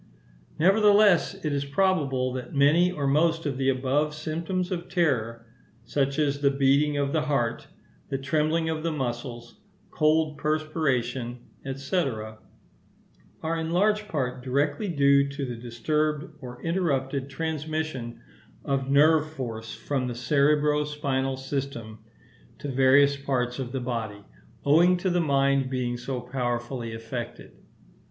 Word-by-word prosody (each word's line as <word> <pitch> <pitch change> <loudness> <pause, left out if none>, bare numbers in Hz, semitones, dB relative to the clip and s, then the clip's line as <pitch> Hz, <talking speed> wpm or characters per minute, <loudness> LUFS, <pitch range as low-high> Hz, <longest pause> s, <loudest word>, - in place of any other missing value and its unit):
Nevertheless, 200 +2 +5
it 150 - 0
is 140 0 0
probable 140 -5 +1
that 130 +2 -6
many 155 +6 +4
or 145 -5 -3
most 165 +4 +2
of 135 -3 -2
the 135 0 +2
above 135 +3 0
symptoms 165 +4 -3
of 175 -1 -4
terror, 120 - 0 0.4
such 140 +3 0
as 140 -2 +1
the 140 - +4
beating 140 +2 +2
of 140 -1 0
the 160 - +2
heart, 140 -7 -1 0.4
the 135 - -1
trembling 155 +4 0
of 160 -1 -2
the 165 +1 -1
muscles, 120 -4 -5 0.3
cold 155 -1 +2
perspiration, 135 -6 -1 0.4
&c., 140 +7 -5
are 110 +5 -7
in 160 0 -3
large 210 +4 +2
part 130 -8 -2
directly 145 +8 0
due 140 -4 +3
to 140 0 -4
the 125 -2 -5
disturbed 150 +7 -2
or 125 -2 -9
interrupted 140 -6 -1
transmission 155 - -4 0.4
of 135 -1 -1
nerve 155 +2 +4
force 115 -6 -6
from 135 -3 -2
the 120 - -4
cerebro 150 +4 +2
spinal 135 -3 -2
system 130 -5 -5 0.6
to 145 - -6
various 135 +2 +4
parts 130 -2 -2
of 125 -2 -4
the 135 - -2
body, 115 -5 -4 0.4
owing 170 +5 +5
to 185 +1 -1
the 175 0 +2
mind 140 -3 +2
being 125 -2 -2
so 125 +1 -4
powerfully 120 -1 -3
affected. 115 +1 -7
140 Hz, 135 wpm, -26 LUFS, 130-155 Hz, 0.6 s, Nevertheless